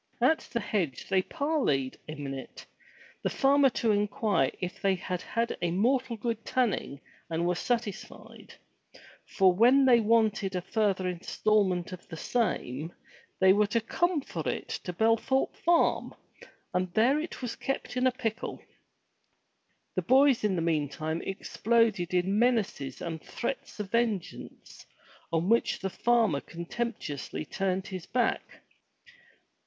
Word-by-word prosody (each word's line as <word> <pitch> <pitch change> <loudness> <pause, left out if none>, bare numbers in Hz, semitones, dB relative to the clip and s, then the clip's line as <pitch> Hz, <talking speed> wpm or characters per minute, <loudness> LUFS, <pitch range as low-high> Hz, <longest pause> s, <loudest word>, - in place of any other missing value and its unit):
At 320 - +4
the 235 - 0
hedge 175 - -2
they 190 -1 +3
parleyed 270 - -1
a 155 - -5
minute, 135 -2 -7 0.6
the - - 0
farmer 275 0 +4
to 230 -2 0
inquire 205 - +1
if 180 0 -5
they 195 -1 +2
had 180 0 -4
had 230 +1 -2
a 175 - +1
mortal 240 +6 +1
good 230 0 -3
tanning 230 - -1 0.3
and 165 +1 -1
were 175 - +2
satisfied, 225 +2 -4 0.7
for 190 -2 +4
when 250 +8 +5
they 245 -2 +6
wanted 215 -3 +2
a 180 - -1
further 195 -3 0
instalment 185 +1 0
of 180 -1 -9
the 160 - -8
same 160 - -1 0.5
they 190 0 +6
were 210 +1 +3
to 230 +3 +1
come 345 +8 0
for - - -6
it - - -4 0.2
to 180 - -2
Bel 225 +6 +3
thorpe 265 +3 0
Farm, 340 0 +2 0.6
and 180 0 0
there 255 +7 +4
it 315 -4 -6
was 240 - -3
kept 270 -1 -4
in 255 0 +3
pickle! 230 -4 -3 1.3
The - - 0
boys 265 0 +4
meantime 160 -4 -1
exploded 215 -1 0
in 190 +4 +2
menaces 215 - 0
and 165 -2 -4
threats 235 -2 -5
of 205 -2 -5
vengeance, 215 -7 -3 0.5
on 165 +1 0
which 230 +3 +2
the 190 - -4
farmer 225 -12 +2
contemptuously 170 - -5
turned 190 +1 -1
his 185 -3 -7
back. 245 -2 -1
205 Hz, 135 wpm, -29 LUFS, 175-235 Hz, 1.3 s, they